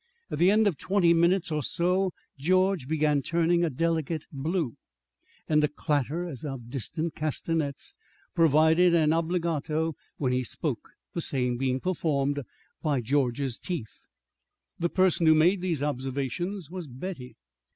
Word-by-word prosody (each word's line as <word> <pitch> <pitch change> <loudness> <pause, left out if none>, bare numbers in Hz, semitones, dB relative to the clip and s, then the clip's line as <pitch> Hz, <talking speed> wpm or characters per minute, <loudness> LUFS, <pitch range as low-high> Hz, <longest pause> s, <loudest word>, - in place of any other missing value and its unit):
At - - -3
the 175 +2 +6
end 215 +2 +4
of 185 -9 +1
twenty 185 -3 +3
minutes 170 +1 +2
or 150 -1 0
so 180 +6 +1 0.2
George 185 0 +2
began 150 -2 +2
turning 170 +3 +2
a 170 - +2
delicate 160 +1 -1
blue 155 - -2 0.7
and 150 -1 +3
a - - +4
clatter 150 +3 -1
as 140 -8 -8
of 130 -5 -6
distant 155 +6 -3
castanets 155 -1 -3 0.4
provided 165 +2 +5
an 155 -2 +4
obligato 165 -2 0 0.2
when 130 -3 0
he 125 0 +1
spoke, 120 - -3 0.2
the 170 - -2
same 125 -5 0
being 130 +1 0
performed 145 -5 0 0.4
by 150 -4 +1
George's 130 0 0
teeth. 155 - -5 0.8
The 170 0 +1
person 185 -3 +2
who 160 - +7
made 175 +5 +4
these 170 -6 -1
observations 145 +6 -3
was 180 -3 -6
Betty. 130 0 -7
160 Hz, 140 wpm, -27 LUFS, 140-175 Hz, 0.8 s, who